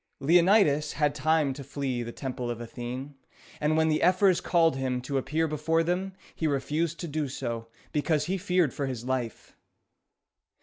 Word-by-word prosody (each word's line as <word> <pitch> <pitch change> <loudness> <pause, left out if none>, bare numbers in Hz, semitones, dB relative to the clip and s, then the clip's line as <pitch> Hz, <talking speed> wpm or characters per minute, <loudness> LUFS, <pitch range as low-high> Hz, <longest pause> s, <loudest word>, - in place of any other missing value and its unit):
Leonidas 170 -2 +4
had 145 -1 +1
time 150 -1 +2
to 140 +1 -8
flee 135 -2 -3
to 120 - -3
the 120 - -5
Temple 125 -2 -4
of 120 -1 -4
Athene; 125 +4 -6 0.5
and 155 +1 +1
when 160 0 +3
the 155 -1 +1
ephors 185 +1 +4
called 165 -4 +3
him 130 -1 -1
to 135 +2 -2
appear 160 +4 0
before 160 +2 +1
them, 185 +3 -1 0.2
he 160 - -1
refused 150 +4 -1
to 170 - -4
do 150 -1 -2
so, 120 -3 -4 0.2
because 150 0 +1
he 185 - -1
feared 180 -6 +1
for 140 - -2
his 125 -3 -5
life. 125 -3 -3
150 Hz, 175 wpm, -28 LUFS, 130-165 Hz, 0.5 s, Leonidas